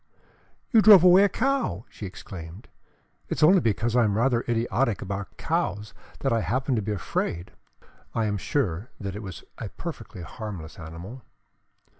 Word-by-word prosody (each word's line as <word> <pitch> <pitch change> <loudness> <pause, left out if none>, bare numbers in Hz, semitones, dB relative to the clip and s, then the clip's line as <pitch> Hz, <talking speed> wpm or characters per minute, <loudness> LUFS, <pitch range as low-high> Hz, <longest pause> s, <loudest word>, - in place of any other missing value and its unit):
"You 225 -4 +6
drove 205 -5 +9
away 185 +2 +8
a - - +2
cow!" 260 - -1
she 100 - -8
exclaimed. 90 0 -10 0.6
"It - - -2
is - - +1
only 185 +5 +7
because 115 0 0
I 125 - +5
am 105 -2 +1
rather 120 0 +2
idiotic 115 -1 +1
about 100 0 -5
cows 100 +1 -2 0.3
that 135 - +1
I 115 - +2
happened 130 +1 0
to - - +1
be 105 +1 -3
afraid. 85 -1 -3 0.6
I 115 - +1
am 105 -1 -1
sure 105 - -1
that 100 -2 -5
it 105 - -5
was 95 -5 -8 0.2
a - - -5
perfectly 90 - -8
harmless 90 -2 -8
animal." 85 +10 -9
110 Hz, 165 wpm, -26 LUFS, 95-130 Hz, 0.6 s, drove